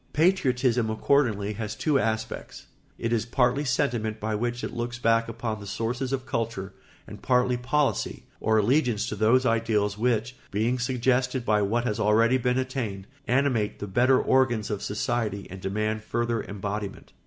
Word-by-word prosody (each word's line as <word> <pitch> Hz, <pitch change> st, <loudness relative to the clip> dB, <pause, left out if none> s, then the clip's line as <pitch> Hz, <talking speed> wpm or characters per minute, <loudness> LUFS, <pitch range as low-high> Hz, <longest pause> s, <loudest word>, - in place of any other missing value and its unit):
Patriotism 130 Hz, -9 st, +2 dB
accordingly 110 Hz, -3 st, +1 dB
has 105 Hz, 0 st, -4 dB
two 145 Hz, +4 st, +1 dB
aspects: 110 Hz, -1 st, -3 dB, 0.3 s
it 115 Hz, +1 st, -1 dB
is 115 Hz, -, +1 dB
partly 130 Hz, +3 st, +2 dB
sentiment 115 Hz, -4 st, 0 dB
by 110 Hz, 0 st, -2 dB
which 120 Hz, +3 st, -2 dB
it -, -, -4 dB
looks 120 Hz, 0 st, -3 dB
back 115 Hz, -1 st, +2 dB
upon 115 Hz, -1 st, -4 dB
the 100 Hz, -, -9 dB
sources 120 Hz, +6 st, -2 dB
of 135 Hz, -1 st, -2 dB
culture, 110 Hz, -6 st, -3 dB, 0.3 s
and -, -, -11 dB
partly 125 Hz, 0 st, +2 dB
policy, 135 Hz, +4 st, 0 dB, 0.2 s
or 110 Hz, 0 st, +2 dB
allegiance 120 Hz, 0 st, +2 dB
to -, -, -3 dB
those 115 Hz, +5 st, +3 dB
ideals 110 Hz, -3 st, +1 dB
which, 120 Hz, +1 st, 0 dB
being 115 Hz, +5 st, 0 dB
suggested 125 Hz, +1 st, 0 dB
by 105 Hz, -2 st, +3 dB
what 115 Hz, +4 st, +1 dB
has 115 Hz, -3 st, -2 dB
already 115 Hz, +4 st, +4 dB
been 125 Hz, +1 st, +1 dB
attained, 125 Hz, -7 st, -3 dB, 0.2 s
animate 125 Hz, -5 st, +1 dB
the -, -, -5 dB
better 125 Hz, +6 st, +3 dB
organs 120 Hz, -5 st, +2 dB
of 105 Hz, -, -3 dB
society 105 Hz, -1 st, -2 dB
and 95 Hz, 0 st, -8 dB
demand 110 Hz, +3 st, -1 dB
further 115 Hz, 0 st, -1 dB
embodiment. 100 Hz, 0 st, -5 dB
115 Hz, 160 wpm, -26 LUFS, 105-125 Hz, 0.3 s, already